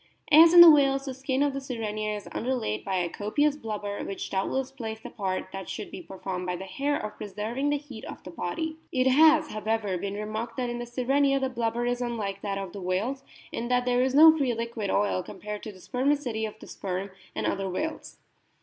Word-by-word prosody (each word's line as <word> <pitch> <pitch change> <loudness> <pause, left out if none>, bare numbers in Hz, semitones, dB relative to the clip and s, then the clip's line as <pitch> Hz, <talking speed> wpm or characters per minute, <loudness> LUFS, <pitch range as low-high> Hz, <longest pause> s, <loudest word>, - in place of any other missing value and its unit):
As 325 +2 +9
in 350 0 +10
the 340 -1 +12
whales, 275 -2 +3
the 265 - -4
skin 265 +1 0
of 285 -1 +1
the 275 - -4
Sirenia 215 -5 -3
is 205 - -8
under 255 +3 -1
laid 105 - -3
by 195 - -2
a 180 -2 +1
copious 280 - 0
blubber, 210 -6 -4
which 195 - -5
doubtless 260 +7 -1
plays 225 -5 -6
the - - -9
part, 185 -3 -3
that 195 -1 -6
should 215 - -6
be - - -7
performed 185 0 -5
by 180 - -1
the 190 +2 -7
hair, 285 +8 -1
of 215 0 -6
pre - - -6
serving 220 +8 -2
the 290 - +2
heat 280 -6 -10
of - - -9
the 180 - -9
body. 315 - -3
It 255 -1 +1
has, 310 +3 +6
however, 215 -3 -1
been 200 +2 -4
remarked 215 +3 -4
that 250 -2 -1
in 240 - -4
the 240 - -5
Sirenia 275 +3 +2
the 265 -1 -1
blubber 235 -1 -1
is 245 0 -1
unlike 215 -5 -3
that 200 -1 -2
of 195 -3 -5
the 200 - -7
whales 210 +10 -1 0.3
in 235 - -3
that 250 0 +1
there 245 0 +2
is 260 +1 +1
no 320 +2 +9
free 265 -6 0
liquid 230 -3 -3
oil 200 -2 +1
comparable 210 +3 -7
to 215 - -7
the 190 - -16
spermaceti 250 -1 0
of 215 - -10
the - - -11
Sperm 190 +1 -4 0.2
and - - -2
other 195 -1 -1
whales. 310 - -4
230 Hz, 230 wpm, -27 LUFS, 200-270 Hz, 0.3 s, the